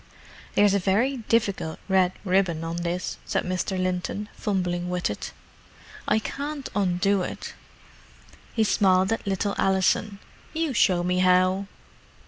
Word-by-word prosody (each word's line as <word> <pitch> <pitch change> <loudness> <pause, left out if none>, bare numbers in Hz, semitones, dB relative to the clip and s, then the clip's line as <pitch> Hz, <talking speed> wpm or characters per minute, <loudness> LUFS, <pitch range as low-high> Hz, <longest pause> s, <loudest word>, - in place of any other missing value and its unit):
"There's 205 -1 +5
a 200 - +3
very 220 +9 +1
difficult 215 -8 0
red 190 -2 +3
ribbon 180 -4 +1
on 165 +1 -3
this," 175 +1 -3
said - - -1
Mr. 185 +1 -2
Linton, 185 +3 -2
fumbling 180 -3 -2
with 180 -9 -1
it. 105 - -6 0.8
"I 210 - +3
can't 280 +5 -4
undo 195 0 +2
it." - - -5 1.0
He 225 - +3
smiled 190 -1 +3
at 225 - -5
little 200 +1 0
Alison. 195 +2 +2 0.4
"You 320 -3 -1
show 180 -6 +3
me 180 +1 +1
how." 185 +1 +3
190 Hz, 130 wpm, -25 LUFS, 180-205 Hz, 1.0 s, There's